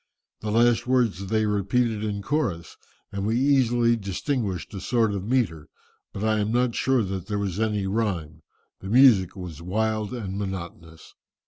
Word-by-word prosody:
The 110 - -4
last 120 +2 +3
words 115 -7 +1
they 110 +1 +1
repeated 105 +2 0
in 100 -2 -3
chorus, 100 - -2 0.4
and 100 -1 -4
we 110 +3 +1
easily 120 -4 +3
distinguished 100 - -3
a 95 - -6
sort 115 -3 +1
of 100 0 -4
metre, 110 - 0 0.4
but 100 - -6
I 110 -1 +2
am 105 +1 0
not 120 0 +1
sure 130 -1 +2
that 95 -1 -5
there 105 -1 -2
was 100 -1 -2
any 105 -3 0
rhyme; 95 -7 -2 0.4
the 95 - -8
music 115 -7 +5
was 90 -5 -8
wild 110 +3 -1
and 100 -6 -4
monotonous." 85 -4 -7
105 Hz, 160 wpm, -25 LUFS, 95-120 Hz, 0.4 s, music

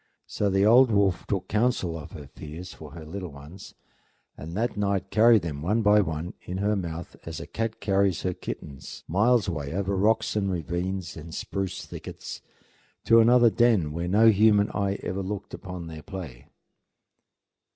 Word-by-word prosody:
So 100 - -1
the 95 +1 +3
old 125 +4 +7
wolf 100 -4 +1
took 100 -3 -2
counsel 105 -6 0
of 80 - -9
her 75 - -8
fears 80 +6 -9
for 75 -2 -12
her 80 -2 -9
little 90 +2 -6
ones, 75 +7 -12 0.6
and 80 +4 -7
that 115 +1 -1
night 100 -2 -1
carried 110 -2 +5
them 75 -4 -4
one 105 +8 +1
by 105 0 +6
one 80 -1 -4
in 90 - -5
her 105 +2 +1
mouth, 85 -3 -5
as 80 -1 -6
a 85 - -7
cat 115 0 -4
carries 100 -2 +1
her 90 - 0
kittens, 70 -5 -8
miles 110 +6 +3
away 75 -5 -3
over 100 +1 -1
rocks 110 +3 +2
and 100 -2 0
ravines 90 +2 -3
and 80 +1 -9
spruce 95 -2 -4
thickets, - - -8 0.6
to 115 - +6
another 120 0 +6
den 110 -11 +3
where 85 +3 -3
no 110 +5 +5
human 105 -1 +4
eye 100 -1 -1
ever 95 +2 -3
looked 100 +1 -5
upon 90 -2 -7
their 80 -1 -8
play. 80 - -9
95 Hz, 170 wpm, -26 LUFS, 85-105 Hz, 0.6 s, old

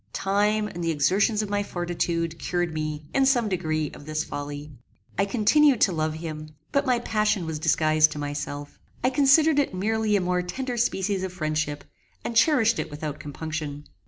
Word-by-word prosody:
Time, 210 +2 +1
and 175 -4 -6
the 165 - 0
exertions 195 +8 +2
of 210 - -5
my 205 0 +1
fortitude, 170 -3 -2
cured 175 -2 -1
me, 155 -1 -4
in 270 - +3
some 255 -4 +3
degree, 155 -5 -1
of 145 - -13
this 155 0 -1
folly. 145 +1 -6 0.4
I 195 - +2
continued 250 +5 +4
to 195 - +5
love 155 -2 -1
him, 155 -1 -7 0.2
but 280 0 +1
my 250 -1 +3
passion 215 -5 0
was 160 -1 -4
disguised 155 -1 +3
to - - -8
myself; 145 0 -5 0.2
I 255 - +3
considered 290 +3 +5
it 275 -9 0
merely 215 +2 +1
as - - 0
a - - -4
more 180 0 +1
tender 250 +8 -4
species 195 -4 0
of 190 -1 -4
friendship, 155 -3 -2 0.4
and 235 - -3
cherished 230 -3 +4
it - - -3
without 150 0 -5
compunction. 150 -1 -5
175 Hz, 185 wpm, -25 LUFS, 155-215 Hz, 0.4 s, to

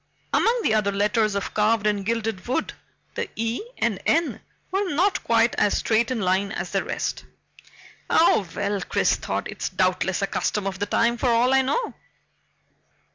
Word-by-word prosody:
Among 470 +1 +3
the - - +2
other 210 -2 +2
letters 210 +1 +1
of 200 - -3
carved 215 0 +2
and 205 -2 +1
gilded 225 -2 -2
wood, 260 +6 -1 0.4
the - - -3
E 230 +2 -2 0.2
and 215 -5 -1
N 330 +1 +1 0.3
were 390 0 0
not 380 +6 +2
quite 230 0 +3
as 205 - +2
straight 225 +1 +1
in 255 -3 -1
line 190 +1 +1
as - - -4
the - - 0
rest. - - -3 0.9
Oh 210 - +4
well, 200 -1 -1
Chris - - +1
thought, - - -3
it's - - -4
doubtless 185 +1 0
a - - +4
custom 205 +1 -2
of 190 -1 -3
the 205 - -1
time 235 +3 +2
for 250 - +1
all 240 +2 +3
I 265 - +5
know. 280 - -1
220 Hz, 175 wpm, -24 LUFS, 200-245 Hz, 0.9 s, I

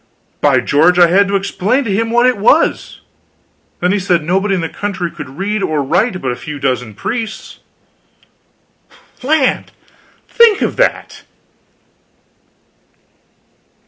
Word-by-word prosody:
By - - +3
George! 160 +5 +3
I 175 - +7
had 200 +3 +3
to 200 - -1
explain 200 +6 0
to 215 -6 -2
him 225 +3 -1
what 240 +1 +2
it 250 -5 +1
was. 285 +10 +1 0.8
Then 180 +1 +1
he 205 - +1
said 180 -4 0
nobody 195 +4 0
in 180 - -2
the 165 - -2
country 190 -2 -4
could 150 -4 -10
read 205 +2 -2
or 155 -6 -1
write 185 - 0
but 130 - -3
a - - -3
few 150 +1 -8
dozen 125 -5 -3
priests. 220 - -5 1.6
Land! 275 0 0 0.6
think 465 -4 +4
of - - -2
that. - - -1
195 Hz, 135 wpm, -15 LUFS, 165-225 Hz, 1.6 s, I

